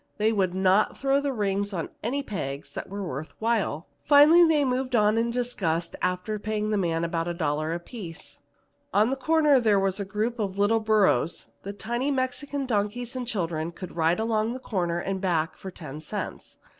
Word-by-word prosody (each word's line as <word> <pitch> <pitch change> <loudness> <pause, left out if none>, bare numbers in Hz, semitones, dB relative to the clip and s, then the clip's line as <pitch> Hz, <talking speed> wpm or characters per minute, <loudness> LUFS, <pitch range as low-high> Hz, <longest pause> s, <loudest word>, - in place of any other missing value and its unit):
They 220 +1 +2
would 185 -3 0
not 190 +2 +3
throw 275 +1 +2
the 285 -1 -1
rings 205 -3 -1
on 170 -3 -3
any 275 +6 -1
peg 140 - -4
that - - -6
was 200 +1 -5
worth 155 -4 -5
while. 220 -8 0 0.2
Finally 305 +4 +7
they 300 -3 +3
moved 255 0 0
on 210 -1 +4
in 230 +1 +1
disgust, 190 -9 -1
after 180 +4 -1
paying 215 0 -2
the 210 - +2
man 165 -3 0
about 165 0 -1
a 175 - -2
dollar 155 -1 -1
apiece. 175 0 -7 0.6
On 215 +5 +4
a - - 0
corner 300 0 +4
were 200 -4 +3
a - - -1
group 215 +4 -2
of 195 -2 -2
little 205 +3 +3
burros, 210 - +1
the 200 - -5
tiny 240 +6 -2
Mexican 275 +1 -2
donkeys 230 +2 -1
and 250 -2 -4
children 170 -7 -2
could 175 0 -9
ride 165 +3 +2
along 220 -1 +1
to 235 - -2
the 255 - -6
corner 175 -8 -1
and 190 +2 -3
back 170 -3 0
for 190 - -8
ten 155 -5 -8
cents. - - -6
205 Hz, 190 wpm, -26 LUFS, 175-240 Hz, 0.6 s, Finally